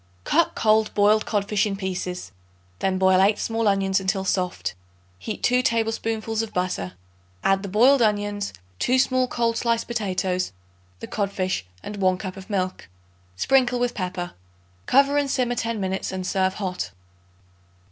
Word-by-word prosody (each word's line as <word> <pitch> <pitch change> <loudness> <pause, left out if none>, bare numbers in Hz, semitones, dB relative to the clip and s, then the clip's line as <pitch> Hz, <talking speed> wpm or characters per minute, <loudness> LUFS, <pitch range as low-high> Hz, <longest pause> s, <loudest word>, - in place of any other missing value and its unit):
Cut 335 +2 +2
cold 215 0 +3
boiled 210 +1 +4
codfish 205 0 +1
in 200 - -2
pieces; 180 - -4 0.5
then 190 -1 0
boil 190 0 +4
8 205 +2 +4
small 225 -1 -1
onions 195 -1 +2
until 190 0 -1
soft; 180 -2 -1 0.5
heat 215 - -6
2 250 +1 +4
tablespoonfuls 225 -1 0
of 225 -1 -6
butter. 180 - -1 0.5
Add 195 0 +3
the 200 - -5
boiled 245 +7 +5
onions, 205 -2 0 0.3
2 255 +1 +2
small 255 0 +2
cold 230 -2 0
sliced 230 -1 +1
potatoes, 185 - -1 0.5
the - - -6
codfish 190 - -2 0.2
and 205 - -6
1 185 -2 +2
cup 185 -1 -6
of 195 +1 -11
milk; 185 - -2 0.5
sprinkle 250 - +3
with 245 0 0
pepper. 180 -2 -4 0.6
Cover 280 +2 +4
and 285 -1 -1
simmer 250 -2 +1
ten 230 -2 -2
minutes 190 0 -2
and 185 -1 -4
serve 190 0 +1
hot. 185 -3 -3
205 Hz, 150 wpm, -24 LUFS, 190-230 Hz, 0.6 s, boiled